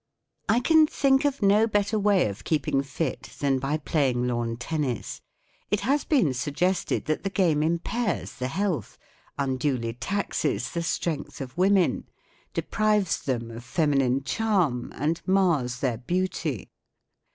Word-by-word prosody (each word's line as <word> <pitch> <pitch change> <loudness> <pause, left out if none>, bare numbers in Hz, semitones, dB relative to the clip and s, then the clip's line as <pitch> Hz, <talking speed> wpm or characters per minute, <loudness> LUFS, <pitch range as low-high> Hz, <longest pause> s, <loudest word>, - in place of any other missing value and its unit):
I 235 +3 +4
can 315 +3 +5
think 275 -1 +2
of 280 -5 0
no 205 +3 +5
better 205 0 +1
way 200 - +3
of 100 +1 -7
keep¬ 155 -3 -1
ing 135 - +2
fit 140 +1 -4
than 135 -2 +1
by 140 +3 -1
play¬ 145 -2 +1
ing 125 0 -1
lawn 120 -2 -1
tennis. 130 -1 -3 0.5
It 205 - +1
has 275 +7 +1
been 255 - +3
suggested 155 +9 -1
that 155 0 -1
the 195 - -2
game 175 -6 +2
impairs 170 +7 -1
the 125 -1 -3
health, 185 +3 -2 0.4
unduly 130 -3 -1
taxes 200 - -2
the 170 - -2
strength 165 -2 -3
of 130 -1 -7
women, 190 0 +2 0.5
deprives 210 -4 +1
them 120 -4 -2
of 115 +1 -8
feminine 135 -3 +1
charm, 175 - 0
and 155 +4 -1
mars 165 -11 +2
their 125 -5 0
beauty. 160 - -2
155 Hz, 145 wpm, -26 LUFS, 130-200 Hz, 0.5 s, can